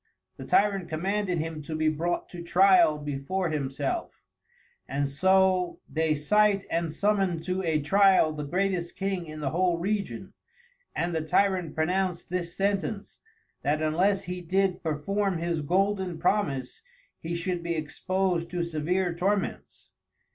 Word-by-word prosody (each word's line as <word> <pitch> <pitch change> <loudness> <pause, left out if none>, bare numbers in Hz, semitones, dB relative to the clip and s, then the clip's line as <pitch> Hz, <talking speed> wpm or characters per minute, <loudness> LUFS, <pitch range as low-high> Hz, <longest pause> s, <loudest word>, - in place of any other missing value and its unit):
The - - -8
Tyrant 200 -3 +2
commanded 185 +3 -1
himto 155 -1 -4
be 155 0 +1
brought 165 +3 -1
to 175 - -8
Tryal 175 -3 +5
before 150 +5 -2
himself, 140 -2 -3 0.6
and 140 +2 -1
so 185 +4 +2
they 160 -1 0
cite 200 +6 +2
and 165 -1 0
summon 195 -1 +1
to 185 +2 -2
a 160 -4 +1
Tryal 190 +1 +4
the 150 -1 -5
greatest 180 +2 -1
King 190 -3 -2
in 155 0 -8
the 135 -2 -1
whole 175 0 +1
Region; 200 +3 -3 0.6
and 170 +1 -1
the 160 - 0
Tyrant 180 +1 +1
pronounced 180 +2 -1
this 175 -2 -3
Sentence, 200 +1 -2 0.4
that 150 +2 0
unless 185 +6 +2
he 180 0 -5
did 185 +1 0
perform 180 +5 -1
his 170 -1 -1
Golden 190 +2 0
Promise 140 -11 -1 0.4
he 170 +1 -4
should 175 0 -2
be 170 0 -2
exposed 175 +3 -1
to 175 -1 -2
severe 170 +3 -1
Torments. 195 +4 -2
175 Hz, 140 wpm, -27 LUFS, 155-190 Hz, 0.6 s, Tryal